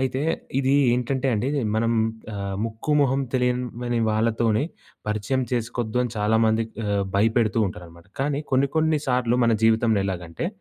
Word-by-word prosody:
అయితే 130 0 -1 0.4
ఇది 135 0 +2 0.2
ఏంటంటే 130 +2 -1
అండి 110 +5 -1 0.3
మనం 115 +1 +1 0.4
ఆహ్, 100 -1 -4
ముక్కుమొహం 135 +4 +1
తెలియమని 125 -1 -1
వాళ్ళతోని 110 +2 +1 0.4
పరిచయం 110 +5 0
చేసుకోద్దని 120 0 -1
చాలామందికి 110 +1 +1
ఆహ్, 100 -1 +1
భయపెడుతూ 110 +1 +2
ఉంటారనమాట. 85 0 -12
కానీ 140 +1 0
కొన్ని 135 +2 +3
కొన్ని 160 -1 +2
సార్లు 125 -1 +1
మన 115 -1 +3
జీవితంలో 110 -1 +3
ఎలాగంటే 90 - -4
115 Hz, 125 wpm, -24 LUFS, 110-130 Hz, 0.4 s, కొన్ని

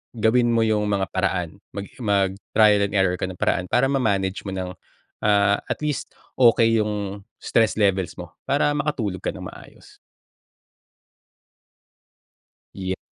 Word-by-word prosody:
gawin 120 +2 +3
mo 115 - +3
yung 105 -1 +1
mga 100 -2 -1
paraan. 90 0 -2 0.2
Maging 100 +5 -8
mag-trial 100 0 +2
and 100 - -7
error 95 -2 +2
ka - - -1
ng 95 - -7
paraan 90 - 0
para 135 +7 +2
ma-manage 100 -7 0
mo 95 - -4
ng, 90 -1 -4 0.5
ah, 100 -1 +3
at - - -3
least 150 -2 -3 0.2
okey 115 -2 +5
yung 105 -2 -3 0.2
stress 110 -2 +1
levels 95 -4 +1
mo 90 -2 -9 0.2
para 145 +1 +2
makatulog 140 -10 -2
ka - - -4
nang - - -8
maayos. - - -16 2.8
Yeah. 95 -1 -3
100 Hz, 135 wpm, -23 LUFS, 95-115 Hz, 2.8 s, okey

